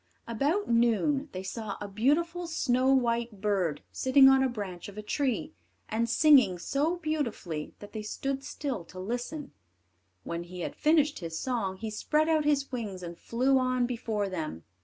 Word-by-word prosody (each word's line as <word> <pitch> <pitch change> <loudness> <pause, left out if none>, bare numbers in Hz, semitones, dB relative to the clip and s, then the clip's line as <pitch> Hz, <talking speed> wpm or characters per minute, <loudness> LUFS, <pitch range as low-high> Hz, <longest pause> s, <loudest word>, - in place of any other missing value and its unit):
About 285 - 0
noon, 240 +5 +2
they 185 0 -5
saw 210 +1 -5
a 205 - -5
beautiful 325 - +1
snow 260 -5 +2
white 235 -4 +1
bird 190 -7 0
sitting 265 +1 +5
on 270 0 +5
the 265 - +3
branch 200 -7 -6
of 200 - -13
a 210 - -5
tree, 285 +6 -1 0.4
and 230 +1 0
singing 260 - +5
so 285 - 0
beautifully 260 - -3
that 205 0 -11
they 215 - -4
stood 270 +5 -3
still 275 - -4
to 185 - -11
listen. 245 +8 -4 0.7
When 170 0 -4
he 180 0 -8
had - - -4
finished 305 -1 +3
his 165 -3 -5
song, 220 -6 -2
he 220 +2 -5
spread 305 +8 +1
out 310 -2 +2
his 280 -2 +1
wings 210 -7 -4
and 170 0 -6
flew 260 +8 +1
on 255 -1 +1
before 225 -4 -2
them. 155 - -5
240 Hz, 170 wpm, -29 LUFS, 200-280 Hz, 0.7 s, sitting